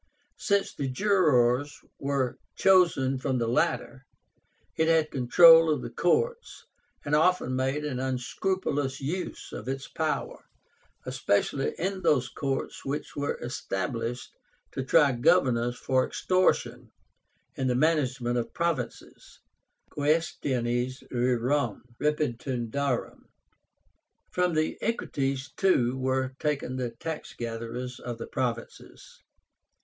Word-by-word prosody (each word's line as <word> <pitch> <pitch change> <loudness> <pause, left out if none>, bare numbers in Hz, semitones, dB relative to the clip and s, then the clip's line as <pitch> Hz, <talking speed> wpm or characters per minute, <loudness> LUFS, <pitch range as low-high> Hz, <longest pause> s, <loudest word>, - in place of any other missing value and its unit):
Since 200 -2 +1
the 140 - -3
jurors 145 - +2 0.2
were 135 -2 -1 0.2
chosen 170 -9 +3
from 130 0 -1
the 115 -1 0
latter, 135 +1 0 0.7
it 160 - +2
had 160 -2 +3
control 165 +5 +7
of 145 -4 -1
the - - -6
courts, 470 - 0 0.4
and 145 - -2
often 155 -4 +3
made 135 +3 -1
an 130 -4 -3
unscrupulous 135 +2 -2
use 165 +7 -4
of - - -7
its 135 +1 -4
power, 160 -1 -3 0.6
especially 120 +7 0
in 190 +2 -2
those 130 -7 +2
courts 135 +1 -3
which 145 +2 -4
were 145 0 -2
established 115 +1 -3 0.4
to 135 - -3
try 145 +1 +4
governors 120 0 +2
for 130 -1 +1
extortion 185 0 0 0.6
in 130 - -1
the 125 - +1
management 130 -5 +1
of 115 - -5
provinces 165 -9 -4 0.5
(quaestiones 130 -5 -1
rerum 125 0 0 0.2
repetundarum). 135 -3 -2 1.1
From 180 -2 +1
the 155 0 0
Equites, 135 - -2
too, 130 -11 +2
were 130 0 -1
taken 145 -4 -1
the 125 -2 -2
tax 155 +7 -6
gatherers 115 +2 -5
of 120 -1 -6
the 115 - -6
provinces. 120 -3 -5
135 Hz, 110 wpm, -27 LUFS, 125-155 Hz, 1.1 s, control